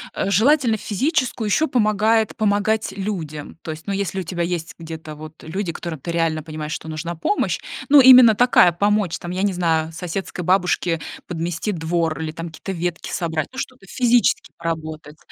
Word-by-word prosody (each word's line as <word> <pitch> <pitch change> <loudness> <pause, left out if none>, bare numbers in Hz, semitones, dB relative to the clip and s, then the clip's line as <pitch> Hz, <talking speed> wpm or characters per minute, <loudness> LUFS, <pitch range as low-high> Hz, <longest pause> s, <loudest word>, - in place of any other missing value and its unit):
Э, 195 - -1
желательно 235 +2 +3
физическую, 235 - -1
ещё 315 +9 +2
помогает 220 -2 +2
помогать 215 +1 +1
людям. 165 -8 -5
То 160 - -4
есть, 155 +5 -10
ну, 200 - -1
если 195 -1 -2
у 185 - -3
тебя 175 0 -3
есть 170 -1 -3
где-то 160 -2 -8
вот 155 +1 -11
люди, 175 +2 -3
которым 160 -2 -6
ты 170 - -5
реально 165 -2 0
понимаешь, 155 -1 -6
что - - -6
нужна 165 +2 -4
помощь. 170 - 0 0.3
Ну, 290 0 +8
именно 250 -4 +9
такая, 245 -7 +5
помочь 200 0 +1
там, 175 - -7
я 185 +1 -2
не 200 -1 +1
знаю, 165 -3 0
соседской 180 +2 -5
бабушке 180 -2 +1 0.3
подмести 175 +4 -3
двор 165 -2 -1
или 155 - -3
там 165 +2 -6
какие-то 195 +4 -7
ветки 175 -1 -3
собрать, 160 -3 -2
ну, 260 - -13
что-то 255 -6 -6
физически 245 0 +2
поработать, 160 -2 -5
175 Hz, 175 wpm, -21 LUFS, 160-210 Hz, 0.3 s, именно